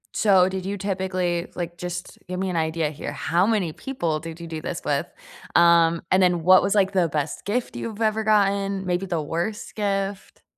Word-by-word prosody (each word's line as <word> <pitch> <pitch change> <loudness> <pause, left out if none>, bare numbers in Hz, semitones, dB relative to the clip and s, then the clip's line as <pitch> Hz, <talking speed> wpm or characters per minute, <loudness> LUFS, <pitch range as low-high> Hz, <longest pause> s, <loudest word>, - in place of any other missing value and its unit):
So, 190 -4 +5
did 190 0 -3
you 200 +1 -3
typically, 185 -3 -1
like 175 -1 -5
just 180 0 -6
give 180 0 -3
me 190 - -1
an - - -4
idea 160 -1 0
here, 150 - -6
how 175 +4 +1
many 200 -8 0
people 170 -13 -2
did 165 +1 -8
you 170 - -7
do 160 -1 -6
this - - -4
with, - - 0 0.5
um, 170 -1 +5
and 185 +1 +5
then 175 -2 +2
what 185 +2 +7
was, 200 +1 0
like, 195 -2 +3
the 180 -4 +2
best 150 0 -3
gift 235 +5 -2
you've 220 -2 -5
ever 220 0 +1
gotten, 200 -2 +2
maybe 180 +1 -1
the 170 -3 -1
worst 170 +8 -3
gift? 195 -2 -3
185 Hz, 200 wpm, -24 LUFS, 170-200 Hz, 0.5 s, what